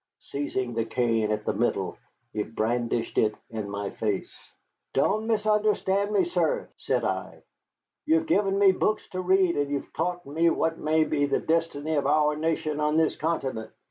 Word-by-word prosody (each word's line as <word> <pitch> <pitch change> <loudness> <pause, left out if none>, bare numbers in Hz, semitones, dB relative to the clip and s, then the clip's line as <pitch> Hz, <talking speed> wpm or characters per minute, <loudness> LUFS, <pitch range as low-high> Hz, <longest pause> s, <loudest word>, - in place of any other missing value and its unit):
Seizing 130 -3 -3
the 115 0 0
cane 115 -1 0
at 105 - -2
the - - 0
middle, - - 0 0.4
he 105 - -1
brandished 115 +2 -1
it 110 -1 +2 0.2
in 110 -3 -4
my 100 0 -4
face. 105 -3 -2 0.6
"Don't 215 +1 +2
misunderstand 210 -2 +1
me, 210 - +3
sir," 470 +7 0
said - - -1
I. - - -3 0.6
"You 320 - +5
have 325 0 +1
given 195 -6 +2
me 200 -1 +6
books 215 +3 0
to 185 -1 -3
read, 185 -1 +3
and 145 -1 -1
have 140 - -6
taught 175 +2 -2
me 160 +4 +2
what 165 0 0
may 155 +1 +2
be 145 -2 +1
the 140 - +1
destiny 160 -2 -1
of 145 -3 +1
our 150 +1 +3
nation 155 -1 -1
on 150 +1 +1
this 160 -1 +2
continent. 135 -8 -2
155 Hz, 175 wpm, -27 LUFS, 120-190 Hz, 0.6 s, me